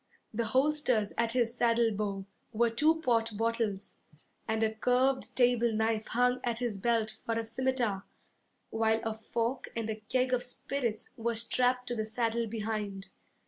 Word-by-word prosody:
The 230 Hz, +1 st, 0 dB
holsters 260 Hz, -3 st, +2 dB
at 230 Hz, 0 st, +1 dB
his 240 Hz, -2 st, +1 dB
saddle 235 Hz, -1 st, +3 dB
bow 200 Hz, -2 st, -3 dB, 0.3 s
were 230 Hz, +1 st, +2 dB
two 310 Hz, +7 st, +3 dB
port 230 Hz, -5 st, +1 dB
bottles, 225 Hz, -3 st, -1 dB, 0.5 s
And 220 Hz, 0 st, +1 dB
a 220 Hz, 0 st, +1 dB
curved 255 Hz, +4 st, +1 dB
table 240 Hz, -2 st, +3 dB
knife 220 Hz, 0 st, 0 dB
hung 250 Hz, +1 st, +2 dB
at 240 Hz, -2 st, -1 dB
his 235 Hz, -5 st, -2 dB
belt 225 Hz, 0 st, +1 dB
for 230 Hz, -, -1 dB
a 230 Hz, -, 0 dB
scimitar, 230 Hz, -3 st, -1 dB, 0.7 s
While 220 Hz, 0 st, +2 dB
a 225 Hz, -, -1 dB
fork 230 Hz, +3 st, -2 dB
and 225 Hz, -1 st, -2 dB
a -, -, -2 dB
keg 255 Hz, +4 st, 0 dB
of 250 Hz, -, +2 dB
spirits 250 Hz, -2 st, -3 dB
were 235 Hz, 0 st, -1 dB
strapped 250 Hz, +2 st, +1 dB
to 240 Hz, -, -1 dB
the 220 Hz, -1 st, -2 dB
saddle 230 Hz, +1 st, 0 dB
behind. 210 Hz, -3 st, -4 dB
230 Hz, 160 wpm, -31 LUFS, 220-245 Hz, 0.7 s, saddle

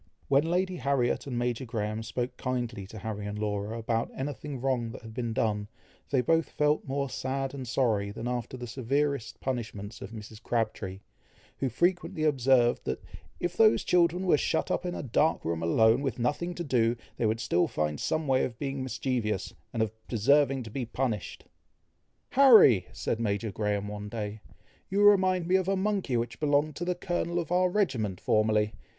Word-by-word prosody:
When 140 Hz, +4 st, +3 dB
Lady 185 Hz, +1 st, 0 dB
Harriet 135 Hz, -1 st, 0 dB
and 125 Hz, -3 st, -3 dB
Major 120 Hz, +1 st, -1 dB
Graham 110 Hz, -2 st, -3 dB
spoke 120 Hz, +2 st, -3 dB
kindly 120 Hz, -6 st, -3 dB
to 110 Hz, -, -10 dB
Harry 105 Hz, -1 st, -5 dB
and 105 Hz, 0 st, -4 dB
Laura, 105 Hz, +1 st, -2 dB
about 115 Hz, 0 st, -1 dB
anything 140 Hz, 0 st, -5 dB
wrong 125 Hz, -3 st, 0 dB
that -, -, -10 dB
had 110 Hz, -1 st, -9 dB
been 120 Hz, -1 st, -3 dB
done, 105 Hz, -2 st, 0 dB, 0.4 s
they 135 Hz, -3 st, +3 dB
both 165 Hz, +6 st, +2 dB
felt 150 Hz, 0 st, +1 dB
more 140 Hz, +1 st, -1 dB
sad 135 Hz, +1 st, -3 dB
and 130 Hz, -3 st, -6 dB
sorry, 110 Hz, -5 st, +1 dB
than 110 Hz, +3 st, -5 dB
after 125 Hz, +1 st, -3 dB
the 125 Hz, -, -6 dB
severest 130 Hz, 0 st, -1 dB
punishments 115 Hz, -5 st, -4 dB
of 95 Hz, -, -6 dB
Mrs. 110 Hz, 0 st, -10 dB
Crabtree, 110 Hz, -5 st, -2 dB, 0.6 s
who 135 Hz, -, 0 dB
frequently 175 Hz, -, 0 dB
observed, 130 Hz, -4 st, +3 dB
that -, -, -3 dB, 0.4 s
"if 175 Hz, 0 st, -2 dB
those 220 Hz, +2 st, +5 dB
children 175 Hz, +1 st, +2 dB
were 160 Hz, -5 st, +4 dB
shut 160 Hz, -, 0 dB
up 180 Hz, -, -1 dB
in 175 Hz, -, -3 dB
a -, -, -4 dB
dark 145 Hz, +5 st, +1 dB
room 80 Hz, 0 st, -1 dB
alone, 110 Hz, +9 st, +4 dB
with 135 Hz, -5 st, -2 dB
nothing 150 Hz, +9 st, -1 dB
to 175 Hz, -, -4 dB
do, 120 Hz, -5 st, +2 dB, 0.2 s
they 115 Hz, -, +1 dB
would 110 Hz, +1 st, 0 dB
still 100 Hz, -7 st, +2 dB
find 75 Hz, -1 st, -2 dB
some 155 Hz, 0 st, -1 dB
way 130 Hz, -1 st, +3 dB
of 115 Hz, -, -3 dB
being 135 Hz, -1 st, -3 dB
mischievous, 125 Hz, -6 st, -2 dB, 0.2 s
and 115 Hz, -, +1 dB
of 110 Hz, -, -2 dB, 0.2 s
deserving 135 Hz, +3 st, +3 dB
to 110 Hz, -, -9 dB
be 130 Hz, +3 st, -3 dB
punished." 120 Hz, -3 st, -3 dB, 0.9 s
"Harry!" 225 Hz, -, +7 dB
said 115 Hz, -, -2 dB
Major 105 Hz, -1 st, -1 dB
Graham 105 Hz, 0 st, -1 dB
one 105 Hz, 0 st, -6 dB
day, 105 Hz, -1 st, -5 dB, 0.5 s
"you 200 Hz, +2 st, +2 dB
remind 185 Hz, -4 st, +5 dB
me 185 Hz, +1 st, +4 dB
of 190 Hz, -1 st, -1 dB
a 195 Hz, -, +2 dB
monkey 190 Hz, -, 0 dB
which 120 Hz, 0 st, -3 dB
belonged 150 Hz, 0 st, +2 dB
to 175 Hz, -, -3 dB
the 180 Hz, 0 st, 0 dB
colonel 175 Hz, -1 st, -2 dB
of 170 Hz, -2 st, -2 dB
our 180 Hz, +1 st, +3 dB
regiment 125 Hz, -, 0 dB
formerly. 110 Hz, 0 st, +2 dB
125 Hz, 185 wpm, -29 LUFS, 110-150 Hz, 0.9 s, Harry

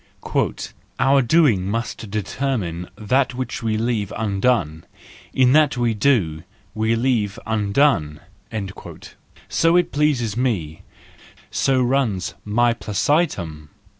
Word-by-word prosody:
" -, -, -12 dB
Our 135 Hz, +1 st, +4 dB
doing 120 Hz, -, +3 dB
must 115 Hz, 0 st, -4 dB
determine 100 Hz, -4 st, -3 dB
what 125 Hz, +4 st, +1 dB, 0.3 s
we 110 Hz, -2 st, -1 dB
leave 110 Hz, -3 st, -1 dB
undone; 100 Hz, -6 st, 0 dB, 0.4 s
in 130 Hz, -1 st, +3 dB
that 150 Hz, -2 st, +4 dB
we 120 Hz, -2 st, +1 dB
do, 105 Hz, -, +1 dB, 0.3 s
we 110 Hz, +1 st, +1 dB
leave 115 Hz, -4 st, 0 dB
undone 105 Hz, -, +1 dB, 0.6 s
" -, -, -14 dB
—so 165 Hz, +1 st, +2 dB
it 180 Hz, -, +1 dB
pleases 140 Hz, -8 st, +1 dB
me, 100 Hz, -11 st, -2 dB, 0.7 s
so 130 Hz, -2 st, +2 dB
runs 120 Hz, -8 st, 0 dB
my 120 Hz, +3 st, +2 dB
placitum 100 Hz, -, -1 dB
115 Hz, 105 wpm, -21 LUFS, 100-130 Hz, 0.7 s, Our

